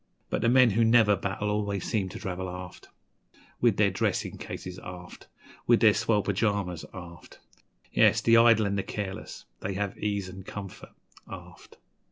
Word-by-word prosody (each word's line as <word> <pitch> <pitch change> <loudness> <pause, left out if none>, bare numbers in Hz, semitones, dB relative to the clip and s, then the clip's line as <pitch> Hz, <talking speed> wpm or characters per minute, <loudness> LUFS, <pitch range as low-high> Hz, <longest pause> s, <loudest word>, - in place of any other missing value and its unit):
But - - -1
the 115 - +3
men 125 -1 +5
who 115 +4 +2
never 115 -2 +5
battle 100 +2 -3
always 100 -2 -2
seem 100 -4 -1
to - - -8
travel 95 0 -5
aft; 90 0 -9 0.7
With - - +3
their - - +3
dressin' - - -2
cases, 90 0 -7
aft, 90 -1 -11 0.4
With 120 -1 +5
their 110 -2 +6
swell 110 -2 +1
pyjamas, 100 -4 -1
aft 85 -2 -11 0.6
Yes! - - +5
the 115 - +4
idle 115 -2 +6
and 100 0 -1
the - - +1
careless, 95 -1 -6
they 95 - -4
have 100 0 -2
ease 100 -2 -2
an' 95 +1 -9
comfort, 100 0 -9 0.4
aft. - - -12
100 Hz, 165 wpm, -27 LUFS, 95-110 Hz, 0.7 s, their